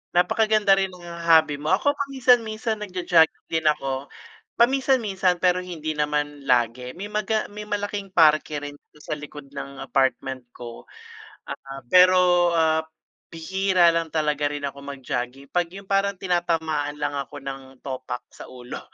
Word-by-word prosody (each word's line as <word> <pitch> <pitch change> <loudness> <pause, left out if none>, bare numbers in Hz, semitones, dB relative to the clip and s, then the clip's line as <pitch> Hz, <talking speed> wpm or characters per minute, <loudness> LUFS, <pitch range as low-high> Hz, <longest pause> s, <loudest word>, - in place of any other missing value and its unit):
Napakaganda 215 +3 +3
rin 195 - +1
nung 175 - -15
hobby 165 -4 +2
mo. 155 +5 +2
Ako 285 +9 +1
paminsan-minsan 245 -6 +1
nagja-jogging 180 -5 +1
din 160 -1 -1
ako, 135 -2 0 0.5
paminsan-minsan 230 -8 +2
pero 180 0 +4
hindi 165 -4 -5
naman 145 -1 -2
lagi, 125 +1 +1
may 200 +4 -7
maga 215 +1 -1
may 210 0 -8
malaking 205 -1 -3
parke 155 -3 +4
rin 145 0 -8
dito 150 - -25
sa - - -8
likod 145 -1 -11
ng 140 -1 -7
apartment 130 -1 0
ko. 120 -1 -10 0.8
Ah, 135 -1 -8
pero, 180 0 +5
ah, 160 -1 +3 0.5
bihira 180 +1 +2
lang 165 -1 -1
talaga 150 -2 0
rin 145 -1 -5
ako 140 0 -5
mag-jogging 135 -1 -5
'pag 175 -1 +1
yung 195 +1 -10
parang 195 -1 +1
tinatamaan 160 -5 -1
lang 145 - -1
ako 140 +1 -5
ng 135 -1 -8
topak 130 -2 -5
sa - - -12
ulo 125 -1 -8
165 Hz, 145 wpm, -24 LUFS, 140-195 Hz, 0.8 s, pero